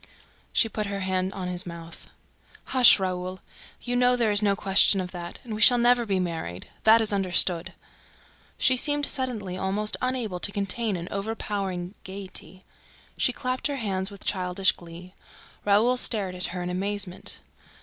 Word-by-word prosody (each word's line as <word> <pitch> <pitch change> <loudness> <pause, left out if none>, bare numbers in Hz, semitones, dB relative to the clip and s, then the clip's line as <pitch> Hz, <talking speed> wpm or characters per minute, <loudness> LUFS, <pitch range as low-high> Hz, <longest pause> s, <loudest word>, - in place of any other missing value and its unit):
She 225 - +3
put 215 -1 -4
her 200 0 -4
hand 185 0 -1
on 185 -2 -5
his 180 0 0
mouth. 170 -1 -10 0.6
"Hush, 255 -2 +8
Raoul!... 185 -1 -4 0.4
You 245 0 -2
know 250 0 +4
there 230 -3 +1
is 205 0 +3
no 200 -1 +2
question 195 0 +5
of 180 -1 -4
that... 175 -1 -7
And 230 - -7
we 215 - -5
shall 245 +3 +8
never 240 0 +3
be 195 -2 0
married: 160 - -4 0.2
that 225 +1 +7
is 215 -2 +1
understood!" 185 -2 +2 0.8
She 255 - +3
seemed 290 +2 +2
suddenly 220 -11 -2
almost 205 +3 0
unable 245 -8 -2
to 205 - 0
contain 200 +2 -2
an 170 0 -7
overpowering 195 -3 -4
gaiety. 190 -1 -8 0.5
She - - +1
clapped 255 +1 -2
her 285 - -3
hands 195 -6 -2
with 200 -2 -13
childish 185 0 +1
glee. 175 +2 -12 0.5
Raoul 215 +5 +3
stared 205 -6 -1
at 180 -1 -4
her 180 0 -5
in 180 - -4
amazement. 190 0 -3
195 Hz, 165 wpm, -26 LUFS, 185-225 Hz, 0.8 s, Hush